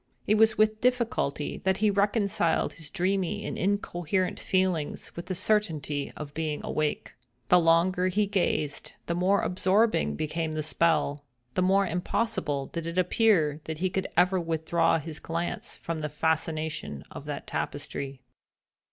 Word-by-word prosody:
It 210 - +3
was 220 0 +4
with 215 0 +2
difficulty 240 - 0
that 190 0 +2
he 215 -1 +3
reconciled 200 -4 +1
his 160 -3 -11
dreamy 195 +2 -1
and - - -3
incoherent 185 -2 -1
feelings 185 -5 -1
with 170 +1 -7
the 185 - -2
certainty 160 -9 0
of 145 -1 -7
being 155 -2 -2
awake. 155 -1 -2 0.4
The 180 - +7
longer 175 +2 +3
he 205 +3 +2
gazed 175 -7 -1
the 170 - -1
more 185 +3 +2
absorbing 185 - +2
became 155 - -2
the 155 - -1
spell—the 145 -4 0
more 195 +2 +4
impossible 175 -5 -1
did 165 +3 -5
it 170 +2 -4
appear 180 -5 +3
that 160 -1 -4
he 185 +3 0
could 190 0 -1
ever 180 +1 +4
withdraw 165 0 +1
his 155 0 -6
glance 170 +1 -4
from 165 -2 -4
the 150 - -2
fascination 155 - -2
of - - -8
that - - -5
tapestry. 135 -1 -4
170 Hz, 145 wpm, -28 LUFS, 155-195 Hz, 0.4 s, The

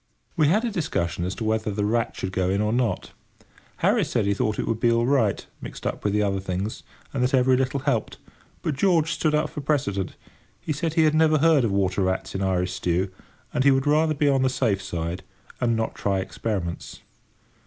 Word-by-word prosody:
We 155 -4 +3
had 210 +10 +2
a 235 - -1
discussion 90 - -2
as 95 +1 -3
to 110 - -5
whether 110 0 0
the 105 0 -1
rat 115 +2 0
should 95 - -4
go 95 -1 0
in 100 +1 +1
or 105 +1 +1
not. 120 -2 -1 0.7
Harris - - +3
said - - +1
that - - +1
he - - +3
thought 105 +1 -1
it - - -1
would 110 - -1
be 120 0 +3
all 115 0 +2
right, 120 -7 +1 0.2
mixed - - -9
up - - -3
with 105 - +1
the 105 +1 +2
other 100 -1 0
things, 95 +3 -4 0.3
and 135 - -1
that 125 +2 +2
every 130 0 +4
little 130 +1 0
helped; - - -1 0.5
but 155 - 0
George 165 +1 +2
stood 155 -2 +1
up 150 - 0
for 150 - -5
precedent. 100 - -1 0.4
He 155 - -3
said 160 +2 -2
he 165 - +5
had 155 -1 +3
never 155 0 +4
heard 155 -2 +4
of 115 - +1
water 95 0 +1
rats 95 0 -1
in 95 - -3
Irish 90 -1 0
stew, 90 +1 -1 0.4
and 130 - +1
he 140 - +6
would 135 -1 +3
rather 155 +1 +3
be 145 +1 +1
on 135 -2 +3
the 130 - +3
safe 110 -7 0
side, 85 -1 -4 0.4
and 120 -2 +1
not 110 0 -1
try 100 -1 -1
experiments. 95 -2 -4
115 Hz, 225 wpm, -24 LUFS, 95-145 Hz, 0.7 s, he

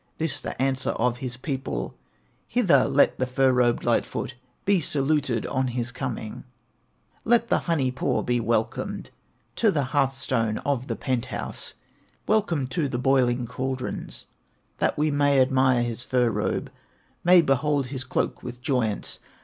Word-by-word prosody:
This 145 -4 -1
the - - -6
answer 130 -1 0
of 120 +1 0
his 125 -2 -4
people: 130 - -3 0.5
"Hither - - +4
let - - +3
the 130 - +1
fur 130 +1 +3
robed 120 -1 +2
Light 120 -1 +3
foot 125 - -5 0.3
Be 200 -1 +4
saluted 140 -4 0
on 130 0 0
his 120 -1 -2
coming; 125 -4 -5 0.8
Let 235 0 +3
the - - +3
Honey 140 -6 +2
paw 130 - 0
be 120 0 +1
welcomed 115 -1 -1 0.5
To 225 - +4
the 150 -7 +1
hearth 135 -2 +2
stone 115 -5 0
of 135 -2 0
the - - -2
penthouse, 130 -4 -4 0.5
Welcomed 170 -12 +1
to 160 -6 0
the 125 - -2
boiling 125 -2 +2
caldrons, 130 +2 -4 0.5
That - - +1
we 150 +1 +2
may 145 -1 +3
admire 130 -2 +3
his 120 0 -3
fur 125 -2 +1
robe, - - -2 0.5
May 175 0 +7
behold 140 0 +1
his 130 -1 -4
cloak 130 - -2
with 125 0 -7
joyance. 125 -5 -1
130 Hz, 150 wpm, -25 LUFS, 125-145 Hz, 0.8 s, May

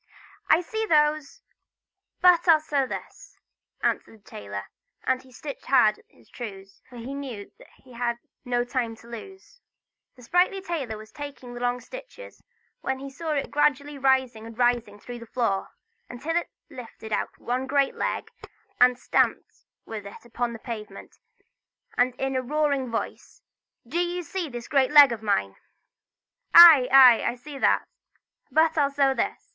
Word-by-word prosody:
"I 325 - +5
see 440 +5 -4
those, 300 -2 +1 0.8
but 360 -1 +5
I'll 325 -2 +7
sew 285 -3 -1
this!" - - -9 0.5
answered 225 - -1
the - - -38
tailor; 100 -1 -7 0.4
and 260 0 0
he 260 - -20
stitched 280 +3 -9
hard 215 -6 +4
at - - -24
his - - -24
trews, 195 -4 -9
for 250 - -14
he 240 +3 -7
knew 255 -8 -7
that - - -17
he 255 -2 -16
had 235 0 -2 0.3
no 245 -1 0
time 245 -2 -3
to 230 - -18
lose. 385 - -12 0.5
The 250 - -16
sprightly 360 +8 +2
tailor 315 - -4
was 215 0 -13
taking 285 -4 -9
the 240 - -7
long 245 0 -1
stitches, - - -12 0.4
when 265 - -3
he 275 +1 -8
saw 315 +3 -4
it 280 - -3
gradually 290 0 0
rising 260 -4 +1
and 230 0 -12
rising 240 -4 0
through 240 +3 -9
the 230 - -11
floor, 220 -5 -1 0.4
until 295 +7 -4
it 345 - -1 0.2
lifted 225 -3 -9
out - - -1
a 250 +2 -2
great 275 0 +1
leg, - - -3 0.5
and 250 0 +5
stamping - - +1 0.4
with 210 -3 -7
it 200 - -13
upon 235 +1 -3
the - - -7
pavement, 215 -4 -9 0.8
said 245 0 +1
in 270 0 -2
a 260 - +1
roaring 280 -1 -1
voice: 230 - -6 0.4
"Do 320 +8 -2
you 350 0 -2
see 345 0 -4
this 240 -2 -8
great 275 -4 +2
leg 290 -3 +8
of 230 -2 -4
mine?" 100 - -1 1.0
"Aye, 325 -7 +10
aye: 255 -3 +8
I - - -1
see 275 +3 -10
that, - - +2 0.6
but 320 0 +3
I'll 285 -1 +3
sew 275 -1 +2
this!" - - -3
260 Hz, 165 wpm, -25 LUFS, 235-295 Hz, 1.0 s, Aye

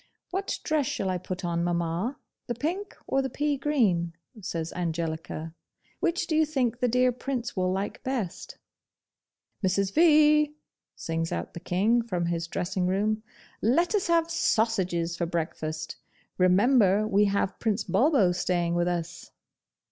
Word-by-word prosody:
'What 385 +2 -2
dress 300 -4 +1
shall 190 -1 -1
I 180 - -1
put 185 0 -5
on, 170 0 0
mamma? 175 +8 -1 0.3
the 240 - -2
pink 350 - -3
or 270 - +1
the 265 - -2
peagreen?' 260 - +1 0.3
says 165 -3 -4
Angelica. 165 -2 -3 0.5
'Which 345 0 0
do 315 - -1
you 315 - +5
think 255 -6 0
the 250 - +2
dear 250 +1 +3
Prince 250 -1 -4
will 185 -1 +1
like 195 +2 -3
best?' 250 -10 -4 1.1
'Mrs. 190 +1 +1
V.!' 300 -2 +5 0.4
sings 165 0 -3
out - - -4
the - - -6
King 200 +7 +2
from 180 -7 -2
his 170 -1 -2
dressing 180 +2 -2
room, 210 +3 0 0.4
'let 325 - +2
us 405 -4 +1
have 335 -1 +2
sausages 190 - +1
for 170 0 -2
breakfast! 155 -2 -4 0.4
Remember 200 +2 +4
we 205 0 +4
have 200 -1 0
Prince 220 -1 0
Bulbo 220 - +3
staying 175 -1 0
with 175 0 +1
us! 175 0 -4
200 Hz, 145 wpm, -27 LUFS, 175-265 Hz, 1.1 s, you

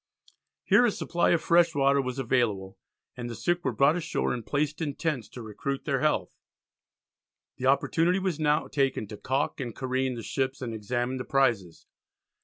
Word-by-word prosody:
Here - - +5
a 240 - +4
supply 175 -4 0
of 170 - +2
fresh 170 -1 +4
water 140 0 +3
was 130 0 -4
available, 110 -7 0 0.4
and 120 -1 -5
the 115 - -6
sick 175 +5 -1
were - - 0
brought 140 +3 +3
ashore 165 -2 -1
and 120 -2 -4
placed 150 +5 -1
in 145 -3 -2
tents 150 - -2
to 120 - -9
recruit 135 +6 -4
their - - 0
health. - - 0 1.2
The 130 - -1
opportunity 165 +6 +2
was 185 -5 -2
now 150 -1 +2
taken 135 -5 0
to 105 - -7
caulk 135 +7 -1
and 120 -4 -5
careen 130 -1 -1
the 115 - -6
ships 135 0 -2
and 120 -3 -4
examine 120 +4 -2
the 130 - -4
prizes. 115 -13 0
135 Hz, 180 wpm, -27 LUFS, 120-150 Hz, 1.2 s, Here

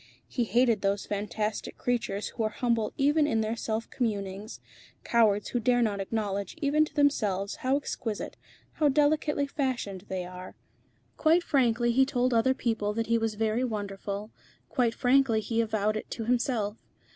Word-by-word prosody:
He 240 - -1
hated 230 0 +3
those 200 0 0
fantastic 210 +1 -3
creatures 230 -5 -1
who 235 - -6
are 215 - +1
humble 230 -1 0
even 295 +2 +3
in 225 -5 +1
their 220 +1 -1
self 225 0 -3
communings, 205 -3 -3 0.4
cowards 215 -3 +3
who 245 - 0
dare 245 +1 +3
not 205 -3 0
acknowledge 200 -1 -2
even 305 0 +3
to 305 - -14
themselves 210 -10 +1
how 260 +2 +1
exquisite, 225 -6 -4 0.4
how 300 -2 +2
delicately 295 0 +2
fashioned 250 -9 -3
they 185 -1 -3
are. 180 +1 -9 0.6
Quite 330 +2 +4
frankly 240 -5 +2
he 265 +3 +5
told 255 -2 +1
other 260 +3 +3
people 220 -4 -1
that 225 +1 -1
he 230 - +4
was 225 -1 -1
very 220 +3 0
wonderful, 205 -2 -4 0.4
quite 235 -3 +1
frankly 255 -3 +3
he 225 +2 0
avowed 215 -1 0
it 215 - -5
to 225 - -4
himself. 235 -3 0
225 Hz, 160 wpm, -28 LUFS, 210-255 Hz, 0.6 s, he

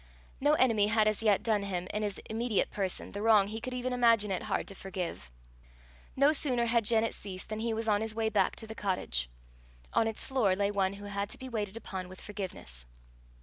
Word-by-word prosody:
No 290 +2 +4
enemy 230 -8 +4
had 215 0 +3
as 215 0 +1
yet 210 -2 +3
done 220 -3 +2
him, 185 -3 -3
in 210 - -1
his 205 -2 -2
immediate 225 -1 0
person, 190 -3 -2
the 200 - -5
wrong 215 -3 +5
he 220 +2 -5
could 255 +2 -4
even 250 0 -2
imagine 230 -4 +4
it 185 - -1
hard - - -2
to - - -8
forgive. 185 - -5 0.9
No 280 +3 +5
sooner 255 -5 +1
had 235 -1 +2
Janet 225 0 +3
ceased 185 -2 -7
than 215 0 -3
he 230 +1 -1
was 225 0 -3
on 205 -1 +3
his 220 -1 -3
way 225 -1 +1
back 200 -3 +2
to 225 - -8
the 220 - -7
cottage: 180 - -1 0.6
on 225 - +3
its 225 - -2
floor 230 -8 +2
lay 200 +1 +1
one 195 -1 +1
who 200 +1 -9
had 200 0 -3
to - - -6
be 260 - -7
waited 215 -3 -3
upon 190 -5 -6
with 185 - -11
forgiveness. 180 - -7
210 Hz, 220 wpm, -31 LUFS, 195-230 Hz, 0.9 s, wrong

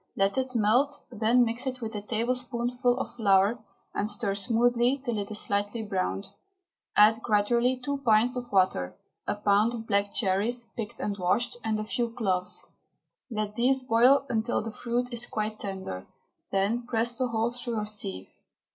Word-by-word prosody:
Let 195 0 +2
it 260 -1 -2
melt, 245 +7 +3 0.2
then 235 +2 +3
mix 235 +3 -1
it 255 -1 -3
with 225 -2 -5
a 210 - -4
tablespoonful 245 +2 -1
of - - -4
flour, 200 +1 +3 0.3
and 205 - 0
stir 205 -1 0
smoothly 240 +4 +2
until 245 -6 -3
it 200 - -4
is 215 -1 +1
lightly 205 +3 -1
browned. 195 -1 -2 0.7
Add 220 +2 +6
gradually 235 +4 +2
two 280 +3 -3
pints 235 0 +3
of 245 -1 -5
water, 185 - +1 0.3
a 205 - 0
pound 210 +3 +2
of 225 -1 -7
black 200 -2 +1
cherries, 220 +4 0
picked 220 -3 -5
and 205 - -2
washed, 240 +7 0
and 220 -1 -1
a - - -2
few 235 +2 -2
cloves. 190 -6 -2 0.6
Let 215 -3 -3
these 260 +4 +2
boil 255 +3 +4
until 230 -1 0
the 225 - -5
fruit 245 +2 -2
is 240 0 0
quite 215 0 -3
tender, 190 - -5 0.4
then 210 +5 0
press 235 0 +2
the 255 +1 -1
whole 230 0 0
through 240 -2 -4
a 210 - -2
sieve. 95 - -5
225 Hz, 170 wpm, -28 LUFS, 205-245 Hz, 0.7 s, Add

